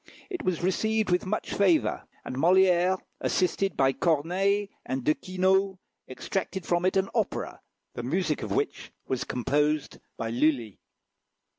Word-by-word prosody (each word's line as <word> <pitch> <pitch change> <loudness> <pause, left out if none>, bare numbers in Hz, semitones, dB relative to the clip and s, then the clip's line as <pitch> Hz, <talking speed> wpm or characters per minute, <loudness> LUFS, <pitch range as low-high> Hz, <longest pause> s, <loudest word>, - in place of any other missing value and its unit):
It 360 -3 -3
was 180 -2 -1
received 220 +3 +1
with 180 +1 +1
much 215 +3 -2
favour, 165 - +2 0.2
and - - -5
Molière, 180 +4 +4 0.2
assisted 190 +2 0
by 135 0 +3
Corneille 185 +7 +1 0.2
and 130 -1 -3
De 150 - +3
Quinault, 190 +2 +1 0.3
extracted 190 +7 -4
from 175 +1 +1
it 185 - +2
an 190 0 +2
opera, - - -2 0.3
the - - -5
music 155 +5 -1
of 105 - -5
which - - -2
was 130 -2 -2
composed 150 +4 0 0.2
by 115 -1 -3
Lulli. 120 -4 0
175 Hz, 140 wpm, -27 LUFS, 140-190 Hz, 0.3 s, Molière